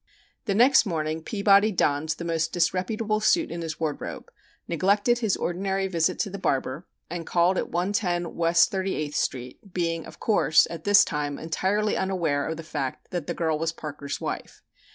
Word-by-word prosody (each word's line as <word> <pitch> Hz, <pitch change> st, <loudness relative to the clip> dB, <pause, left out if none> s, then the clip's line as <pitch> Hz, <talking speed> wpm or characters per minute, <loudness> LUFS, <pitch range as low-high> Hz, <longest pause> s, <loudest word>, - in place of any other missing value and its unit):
The 200 Hz, -, 0 dB
next 245 Hz, +1 st, +5 dB
morning 160 Hz, -2 st, -2 dB
Peabody 200 Hz, +3 st, +3 dB
donned 150 Hz, -4 st, 0 dB
the 170 Hz, +2 st, -2 dB
most 165 Hz, -1 st, -1 dB
disreputable 195 Hz, +5 st, 0 dB
suit 325 Hz, +10 st, +2 dB
in 170 Hz, -, -4 dB
his 160 Hz, -2 st, -5 dB
wardrobe, 155 Hz, -3 st, -4 dB, 0.4 s
neglected 200 Hz, +8 st, +2 dB
his 220 Hz, -5 st, 0 dB
ordinary 195 Hz, +2 st, -1 dB
visit 180 Hz, 0 st, 0 dB
to 200 Hz, -, -3 dB
the 200 Hz, -, -6 dB
barber, 135 Hz, 0 st, -1 dB, 0.2 s
and 170 Hz, 0 st, -5 dB
called 175 Hz, +2 st, +3 dB
at -, -, -2 dB
110 175 Hz, -1 st, -1 dB
West 170 Hz, +4 st, +3 dB
Thirty 190 Hz, -1 st, -1 dB
eighth 150 Hz, -1 st, -3 dB
Street, 125 Hz, -1 st, -2 dB, 0.2 s
being, 165 Hz, -2 st, -1 dB
of -, -, -13 dB
course, 200 Hz, -7 st, +4 dB
at 165 Hz, -2 st, -7 dB
this 205 Hz, 0 st, +6 dB
time 145 Hz, -2 st, -3 dB
entirely 195 Hz, +6 st, 0 dB
unaware 170 Hz, -7 st, 0 dB
of 160 Hz, 0 st, -3 dB
the 165 Hz, -, -7 dB
fact 145 Hz, -4 st, -5 dB
that 175 Hz, -4 st, -3 dB
the -, -, -3 dB
girl 160 Hz, -2 st, 0 dB
was 165 Hz, 0 st, 0 dB
Parker's 145 Hz, -3 st, -6 dB
wife. -, -, -6 dB
170 Hz, 175 wpm, -26 LUFS, 160-195 Hz, 0.4 s, this